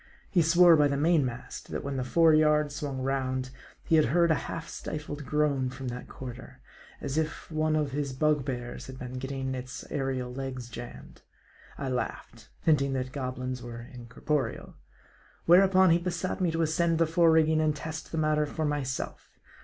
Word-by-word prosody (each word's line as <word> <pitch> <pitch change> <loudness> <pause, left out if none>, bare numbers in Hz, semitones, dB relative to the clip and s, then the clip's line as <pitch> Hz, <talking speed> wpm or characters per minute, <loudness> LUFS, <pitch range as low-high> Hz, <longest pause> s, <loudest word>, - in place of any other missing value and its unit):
He 180 - +4
swore 170 +1 +7
by 150 -2 +4
the 140 0 -1
main 160 +1 +3
mast, 125 0 -6
that - - -4
when 140 0 -3
the 130 - -1
fore 160 +5 +4
yard 150 -1 +4
swung 140 -3 -4
round, 130 -1 -1 0.3
he 160 - +3
had 155 - +5
heard 170 +6 +3
a 160 - -1
half 165 - -5
stifled 150 -2 -6
groan 140 -2 +1
from 130 0 -6
that 125 +1 -7
quarter; 125 -2 -9 0.4
as 140 +3 -2
if 155 +1 -4
one 155 0 +1
of 150 -2 0
his 140 0 -2
bugbears 130 -3 -1
had 130 0 -9
been 125 0 -6
getting 135 0 -3
its 130 0 -6
aerial 130 -3 -2
legs 130 -2 -5
jammed. 120 0 -10 0.6
I 140 - -3
laughed: 125 -3 -5
hinting 140 -4 +3
that 130 -1 -2
goblins 130 -1 -4
were 120 -1 -7
incorporeal. 125 +2 -3 0.7
Where 175 +3 +8
upon 190 -2 +5
he 170 - +4
besought 180 +2 -3
me 180 - +2
to 165 0 0
ascend 165 +1 +1
the 165 - +4
fore 165 +1 +4
rigging 160 -1 +4
and 155 -1 +1
test 160 +1 -6
the 165 - -3
matter 155 -1 +2
for 155 +1 -3
myself. 140 -3 -3
145 Hz, 180 wpm, -28 LUFS, 130-160 Hz, 0.7 s, Where